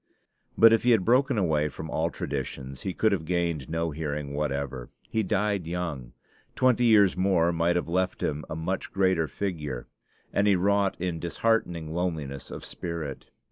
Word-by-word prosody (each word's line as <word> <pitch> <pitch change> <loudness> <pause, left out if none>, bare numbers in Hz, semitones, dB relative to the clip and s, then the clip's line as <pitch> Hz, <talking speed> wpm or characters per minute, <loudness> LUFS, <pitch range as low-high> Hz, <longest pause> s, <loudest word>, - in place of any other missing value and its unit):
But 115 0 +8
if 115 - +4
he 125 - +2
had 110 -6 +4
broken 130 +2 +3
away 75 -6 +1
from 80 +1 -7
all 80 +1 0
traditions, 70 -4 -5
he 95 - -2
could 110 +4 +2
have 95 -5 0
gained 85 -5 -1
no 80 0 -1
hearing 75 -2 -4
whatever; 70 -3 -3 0.2
he 110 - +1
died 100 -2 0
young 85 -8 -4 0.4
twenty 125 -1 +3
years 105 -5 +5
more 90 -2 +3
might 85 +1 +1
have 90 - 0
left 90 +2 -1
him 75 +1 -1
a 80 - -4
much 85 +4 -3
greater 95 -4 +2
figure; 75 -11 -4 0.5
and 100 +1 +2
he 100 - +5
wrought 100 +1 +1
in 85 -2 -2
disheartening 85 -4 0
loneliness 80 -6 -3
of - - -7
spirit. 80 -5 -6
85 Hz, 170 wpm, -27 LUFS, 75-100 Hz, 0.5 s, But